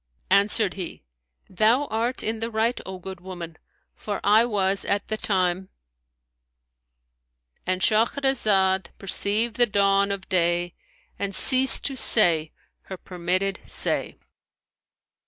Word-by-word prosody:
Answered 200 0 +2
he, 185 -4 -8 0.4
"Thou 225 +9 +1
art 235 +1 -3
in 220 0 -3
the 225 +1 -4
right, 230 +2 -1
O 190 0 -7
good 190 0 -10
woman; 175 -3 -9 0.4
for 205 -2 -6
I 215 +3 +4
was, 195 -4 0
at 200 0 -2
the 215 - -1 2.5
time"—And 185 0 -2
Shahrazad 215 -5 +1
perceived 210 +3 0
the 240 -1 +3
dawn 200 -1 +1
of 195 -1 -6
day 175 -1 0 0.5
and 200 -1 -4
ceased 260 0 +4
to 275 - -2
say 170 -10 +5 0.3
her 190 - -8
permitted 185 +2 -3
say. - - 0
200 Hz, 115 wpm, -23 LUFS, 185-225 Hz, 2.5 s, say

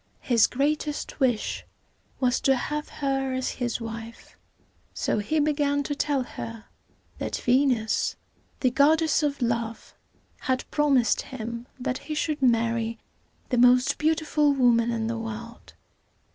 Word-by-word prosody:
His 235 -4 +4
greatest 295 +3 -2
wish 245 -5 0 0.6
was 250 -1 +2
to 270 - +4
have 300 +4 -3
her 270 -2 -1
as 260 0 -1
his 240 -1 -1
wife: 230 0 -8 0.6
so - - 0
he 305 +10 0
began 290 -1 +1
to 290 - -2
tell 285 -2 0
her 230 -2 -8 0.5
that - - -4
Ve´nus, 250 -3 +1 0.5
the 255 - +3
goddess 305 +4 +3
of 285 -3 -1
love, 230 -1 -2 0.5
had 260 -1 -1
promised 275 -7 +3
him 235 -1 -6
that 255 0 -2
he 305 - -5
should 300 -1 -1
marry 230 -2 +1 0.5
the 250 - +1
most 250 +1 +5
beautiful 305 -2 +2
woman 240 -3 +3
in 230 -1 -1
the 230 0 -2
world. 225 +1 -8
255 Hz, 130 wpm, -26 LUFS, 230-285 Hz, 0.6 s, most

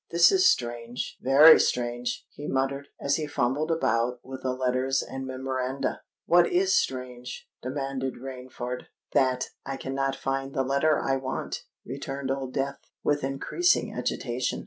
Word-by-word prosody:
"This 170 0 +6
is 375 -1 +5
strange—very 125 - +5
strange!" 120 0 -1
he 145 - -8
muttered, 135 +1 -1
as 140 - +1
he 155 -2 -3
fumbled 145 +3 0
about 120 -6 +1
with 130 0 -8
the 130 - -1
letters 130 +1 0
and 135 0 -6
memoranda. 130 +1 -2 0.2
"What 175 0 +5
is 370 +1 +3
strange?" 125 -1 -2
demanded 135 0 -3
Rainford. 125 -1 -6 0.3
"That 130 -1 +2
I 135 0 -4
cannot 135 0 -1
find 135 0 -3
the 135 - +2
letter 140 +3 +2
I 135 0 +1
want," 130 0 -4 0.2
returned 135 +1 -4
Old 135 -1 -3
Death, 140 +1 -2 0.2
with 145 -1 +1
increasing 140 - +1
agitation. - - -2
135 Hz, 140 wpm, -27 LUFS, 125-140 Hz, 0.3 s, This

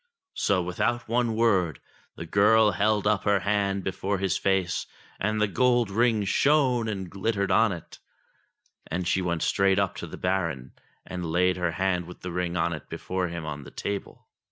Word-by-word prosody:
So, 95 -3 +1
without 120 +7 -1
one 115 -1 +1
word, 95 - +2 0.4
the 85 - -7
girl 105 +5 +4
held 105 +2 +1
up 105 -1 +2
her 100 -2 +3
hand 100 -1 0
before 95 +2 -2
his 95 -2 0
face 95 -4 0 0.3
and 110 +2 0
the 105 - +3
gold 120 0 +2
ring 110 -1 +2
shone 130 0 +2
and 95 -3 -3
glittered 100 +1 -1
on 110 0 +4
it; 85 -3 -8 0.9
and 90 +1 -2
she 95 - +1
went 85 -3 -1
straight 95 -1 +2
up - - 0
to - - -6
the - - -9
Baron, 85 -9 -2 0.3
and 90 -3 -5
laid 90 +2 +2
her 90 -2 -1
hand 90 -2 0
with 90 - -11
the 90 - -5
ring 90 0 -2
on 85 0 +1
it 75 - -8
before 95 -1 -3
him 85 -2 -6
on 70 -2 -5
the - - -11
table. 100 -1 -5
95 Hz, 180 wpm, -26 LUFS, 90-105 Hz, 0.9 s, girl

